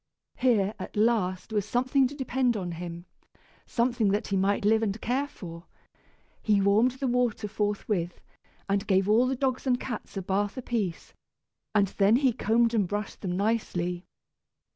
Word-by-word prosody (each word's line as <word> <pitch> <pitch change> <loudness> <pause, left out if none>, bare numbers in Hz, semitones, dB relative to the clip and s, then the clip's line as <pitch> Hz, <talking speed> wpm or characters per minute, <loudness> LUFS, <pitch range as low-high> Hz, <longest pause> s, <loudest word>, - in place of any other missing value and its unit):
Here, 220 -5 +2
at - - -7
last, 210 -3 +1
was 205 -2 +1
something 255 +5 +2
to 285 - -9
depend 260 -3 0
on 180 -3 -4
him, 170 0 -7 0.6
something 235 -2 +1
that 205 +3 -1
he 200 - 0
might 200 +1 +1
live 220 +1 +4
and 215 -1 -1
care 260 +6 -1
for. 170 -8 -10 0.7
He 210 -2 +3
warmed 210 +6 +3
the 265 +1 -4
water 245 -4 0
forthwith, 205 -4 -2 0.5
and 200 +1 0
gave 190 0 +3
all 230 +4 +4
the 265 - 0
dogs 260 0 -1
and 250 -1 +2
cats 240 -5 -6
a 195 - -3
bath 200 +5 -1
apiece, 225 -8 -3 0.6
and 200 -2 +4
then 200 +3 +5
he 260 -1 +3
combed 230 +2 +2
and 205 -5 +2
brushed 205 +2 -4
them 180 -2 -2
nicely. 185 -4 -1
210 Hz, 165 wpm, -27 LUFS, 195-245 Hz, 0.7 s, then